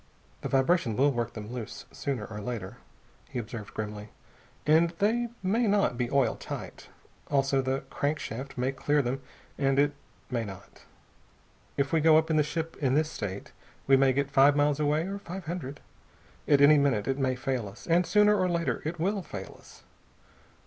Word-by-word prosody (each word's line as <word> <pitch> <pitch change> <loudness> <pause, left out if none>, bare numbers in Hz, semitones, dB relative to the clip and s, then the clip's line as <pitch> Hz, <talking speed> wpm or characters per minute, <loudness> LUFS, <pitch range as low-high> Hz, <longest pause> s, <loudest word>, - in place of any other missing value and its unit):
"The - - -4
vibration 135 -3 +2
will 140 +4 +4
work 120 -4 -2
them 110 +1 -7
loose, 120 -4 -7
sooner 135 -7 -3
or 105 -1 -7
later," 105 -4 -5 0.5
he - - -6
observed 115 -2 -6
grimly, 105 0 -5 0.6
"and 160 +3 +5
they 235 +5 +1
may 220 +5 +2
not 200 -10 +2
be 120 0 -1
oil 135 -1 +2
tight. - - -8 0.4
Also, 135 -1 +2
the 130 +1 -1
crankshaft 140 -3 -3
may 125 +2 0
clear 145 +2 +1
them, 130 +2 -2 0.4
and 135 -1 +2
it 145 +1 +3 0.4
may 120 -2 0
not. 100 -2 -11 0.9
If 140 +1 0
we 160 - +4
go 155 0 +6
up 160 +1 +1
in 155 - +3
the - - +5
ship 160 +2 -3
in 135 -2 +1
this 155 +1 +1
state 100 -2 -5 0.3
we 135 - +6
may 135 0 +4
get 140 +1 -1
five 140 +1 +6
miles 145 0 +2
away, 150 +1 +2
or 200 +1 -4
five 190 -1 -7
hundred. 155 -4 -5 0.7
At 140 -1 +5
any 145 +1 +7
minute 130 -8 +1
it 135 +1 0
may 130 -1 +1
fail 125 -3 -2
us, 100 - -12
and 170 +1 +3
sooner 210 0 +5
or 185 -2 +1
later 170 -1 -1
it 160 +3 -3
will 195 +4 0
fail 100 - -8
us. - - -17
140 Hz, 185 wpm, -28 LUFS, 125-160 Hz, 0.9 s, any